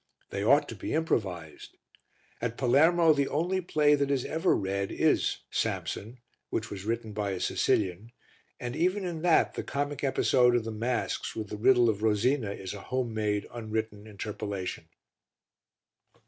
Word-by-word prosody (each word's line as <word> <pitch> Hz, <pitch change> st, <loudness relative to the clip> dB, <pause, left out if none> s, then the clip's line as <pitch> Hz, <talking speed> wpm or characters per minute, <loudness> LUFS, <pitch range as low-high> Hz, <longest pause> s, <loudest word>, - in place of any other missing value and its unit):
They 100 Hz, -, -3 dB
ought 140 Hz, +7 st, +4 dB
to -, -, -6 dB
be -, -, -3 dB
improvised. 95 Hz, -, -2 dB, 0.6 s
At 115 Hz, 0 st, -2 dB
Palermo 160 Hz, +6 st, +5 dB
the 140 Hz, -2 st, +1 dB
only 180 Hz, +5 st, 0 dB
play 150 Hz, -4 st, +3 dB
that 140 Hz, -1 st, +1 dB
is 135 Hz, -3 st, 0 dB
ever 165 Hz, +4 st, +1 dB
read 100 Hz, 0 st, -2 dB
is -, -, +1 dB
Samson, 115 Hz, +5 st, -2 dB, 0.3 s
which 110 Hz, -, -3 dB
was 100 Hz, -1 st, -6 dB
written 115 Hz, -1 st, -2 dB
by 100 Hz, -2 st, -2 dB
a 95 Hz, -, -4 dB
Sicilian, 100 Hz, +5 st, 0 dB, 0.5 s
and 120 Hz, +1 st, -4 dB
even 185 Hz, +5 st, +1 dB
in 170 Hz, -3 st, -4 dB
that 175 Hz, -1 st, +3 dB
the -, -, -3 dB
comic 145 Hz, 0 st, -3 dB
episode 125 Hz, -2 st, +3 dB
of 120 Hz, -, +1 dB
the 115 Hz, -, -4 dB
masks 115 Hz, +3 st, -2 dB
with 110 Hz, -2 st, -5 dB
the -, -, -5 dB
riddle 120 Hz, +2 st, +5 dB
of 105 Hz, -2 st, 0 dB
Rosina 110 Hz, +2 st, +2 dB
is 95 Hz, -1 st, -6 dB
a 100 Hz, -, -8 dB
home 125 Hz, -1 st, -2 dB
made, 105 Hz, -2 st, -1 dB
unwritten 110 Hz, -2 st, -4 dB
interpolation. 100 Hz, -2 st, -5 dB
115 Hz, 160 wpm, -29 LUFS, 105-145 Hz, 0.6 s, Palermo